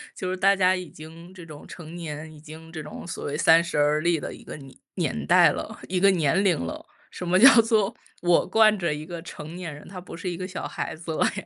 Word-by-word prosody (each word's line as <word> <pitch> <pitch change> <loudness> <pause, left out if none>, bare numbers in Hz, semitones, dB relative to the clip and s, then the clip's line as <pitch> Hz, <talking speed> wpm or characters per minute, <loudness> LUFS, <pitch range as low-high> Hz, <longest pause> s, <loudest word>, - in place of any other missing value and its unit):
就 185 -1 -4
是 185 - -3
大 195 +1 +4
家 185 -1 +3
已 180 -2 -4
经 165 +3 -13
这 175 -3 -11
种 150 -2 -12
成 165 -1 -10
年， 155 -1 -7
已 150 - -14
经 160 +1 -12
这 160 -2 -6
种 150 - -9
所 170 - -6
谓 145 +1 -3
30 165 0 +4
而 150 +1 +3
立 170 -1 +1
的 - - -6
一 - - -13
个 - - -8
年 135 -3 -12 0.2
年 75 -1 -2
代 - - +6
了， - - -5
一 180 0 0
个 195 +1 +5
年 170 +1 +1
龄 175 -5 +3
了， 85 - -6 0.3
什 180 - -7
么 180 +2 +3
叫 245 +2 +8
做 220 -3 +1 0.3
我 175 -1 +3
惯 215 +1 +4
着 170 -4 0
一 150 +1 -6
个 170 -1 -7
成 160 -1 -9
年 170 -5 -6
人， 145 - -13
他 185 -1 -8
不 180 - -10
是 170 +2 -5
一 175 - -5
个 185 0 -5
小 185 - -6
孩 160 - -5
子 165 0 -7
了 - - +1
呀。 205 - -3
170 Hz, 270 characters per minute, -25 LUFS, 155-185 Hz, 0.3 s, 叫